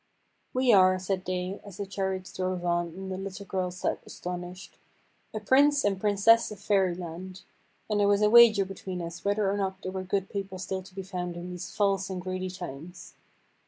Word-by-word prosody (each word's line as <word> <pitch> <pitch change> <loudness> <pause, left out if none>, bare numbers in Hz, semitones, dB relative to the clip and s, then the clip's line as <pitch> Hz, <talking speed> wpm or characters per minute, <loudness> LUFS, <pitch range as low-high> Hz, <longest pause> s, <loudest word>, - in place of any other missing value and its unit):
"We 255 -2 +3
are," 185 -1 +6
said 185 0 -2
they, 185 +2 -3
as 200 -3 -11
the 200 - -3
chariots 190 -1 -3
drove 185 -1 -2
on, 175 0 +1
and 190 0 -6
the 185 - -4
little 195 +1 -6
girl 185 -1 -1
sat 180 +1 -2
astonished, 180 +1 -7 0.5
"a 215 - -4
Prince 280 +6 +4
and 195 -2 0
Princess 215 +3 +4
of 210 - -8
Fairyland, 185 -2 -1 0.4
and 210 -1 0
there 205 - +4
was 205 +1 +3
a 210 - +5
wager 225 -4 +8
between 190 -1 -6
us 170 0 -6
whether 205 0 +1
or 200 +1 0
not 190 -1 -3
there 185 - -3
were 190 0 -3
good 190 +1 -1
people 195 -2 -5
still 190 +1 -3
to 185 0 -16
be 195 - -5
found 180 -2 -4
in 175 +1 -6
these 180 -1 -6
false 195 -2 +1
and 185 -1 -3
greedy 185 +1 -3
times. 180 +1 -8
190 Hz, 195 wpm, -28 LUFS, 180-200 Hz, 0.5 s, wager